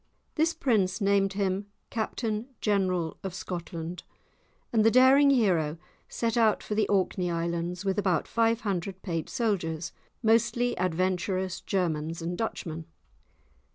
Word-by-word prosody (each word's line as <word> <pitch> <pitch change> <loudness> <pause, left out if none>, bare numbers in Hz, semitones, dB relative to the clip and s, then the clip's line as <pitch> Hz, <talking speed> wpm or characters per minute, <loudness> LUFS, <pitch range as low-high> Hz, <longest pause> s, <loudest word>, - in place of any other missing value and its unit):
This 325 +2 +1
prince 200 -7 +1
named 200 -1 +2
him 195 0 -1 0.2
Captain 220 0 -2
General 185 -5 0
of 190 -2 -5
Scotland, 170 -2 -5 0.7
and 220 -2 +4
the 225 - +6
daring 260 +4 +6
hero 180 - +2 0.3
set 230 -1 -1
out 225 -3 +3
for - - -4
the 215 +1 +2
Orkney 185 -2 +1
Islands 170 +2 -2
with 195 +1 +1
about 185 -3 +1
five 230 0 +2
hundred 190 -2 -3
paid 165 -4 -3
soldiers, 170 -8 -1 0.3
mostly 235 +2 +2
adventurous 185 +1 0
Germans 165 -4 -1
and 170 +1 -3
Dutchmen. 165 -6 -4
190 Hz, 125 wpm, -28 LUFS, 175-220 Hz, 0.7 s, the